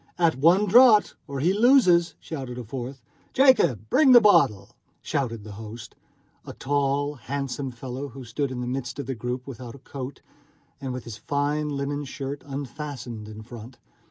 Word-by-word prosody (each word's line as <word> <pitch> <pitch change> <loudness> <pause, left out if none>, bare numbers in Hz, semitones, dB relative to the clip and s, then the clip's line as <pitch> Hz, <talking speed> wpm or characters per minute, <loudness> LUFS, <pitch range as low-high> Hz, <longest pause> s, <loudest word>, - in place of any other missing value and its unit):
"At 165 -5 +2
one 170 +9 +4
draught, 225 +1 +6
or 140 -2 -4
he 175 +5 +3
loses!" 205 -7 +4
shouted 130 -6 -6
a 125 - -5
fourth. 125 +2 -7 0.3
"Jacob, 255 - +4
bring 270 -5 +6
a - - +11
bottle!" 170 - +3 0.3
shouted 115 -6 -2
the 105 - -9
host, 110 +2 -9 0.5
a - - -9
tall, 145 +1 0
handsome 140 +1 -4
fellow 130 +3 -6
who 135 0 -10
stood 135 +5 -2
in 125 -1 -5
the - - -3
midst 125 -1 -4
of 140 - -4
the 135 - -3
group, 125 +2 -4
without 125 -2 -9
a 135 - -17
coat, 135 0 -7 0.6
and 135 -1 -4
with 125 0 -5
his 115 -3 -8
fine 145 +4 -1
linen 145 +1 -3
shirt 135 +1 -6
unfastened 135 -5 -6
in 110 0 -9
front. 120 +1 -11
135 Hz, 170 wpm, -25 LUFS, 120-150 Hz, 0.6 s, a